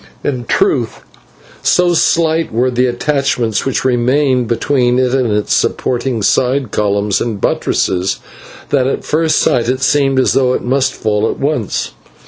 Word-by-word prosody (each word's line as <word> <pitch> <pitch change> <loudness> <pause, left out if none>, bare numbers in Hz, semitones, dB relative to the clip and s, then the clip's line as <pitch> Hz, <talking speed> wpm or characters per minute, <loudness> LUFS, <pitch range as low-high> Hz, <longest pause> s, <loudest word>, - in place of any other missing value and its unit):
In 125 -4 -3
truth 390 - 0 0.6
so 180 -1 +2
slight 165 -1 +1
were 125 +3 0
the 125 +1 +1
attachments 125 -3 -1
which 135 - -2
remained 130 0 +1
between 125 +1 +1
it 130 -1 +1
and 130 -4 +1
its 105 0 0
supporting 125 -3 -1
side 130 +1 +1
columns 100 -1 0
and 110 -4 -3
buttresses, 95 0 0 0.5
that 130 -2 +1
at 135 - -3
first 160 0 +1
sight 120 -1 +1
it 130 +1 -1
seemed 135 -2 +2
as 130 - +2
though 130 -2 +2
it - - -4
must 130 +2 0
fall 110 0 0
at - - -4
once. 140 -7 -2
125 Hz, 150 wpm, -14 LUFS, 115-140 Hz, 0.6 s, so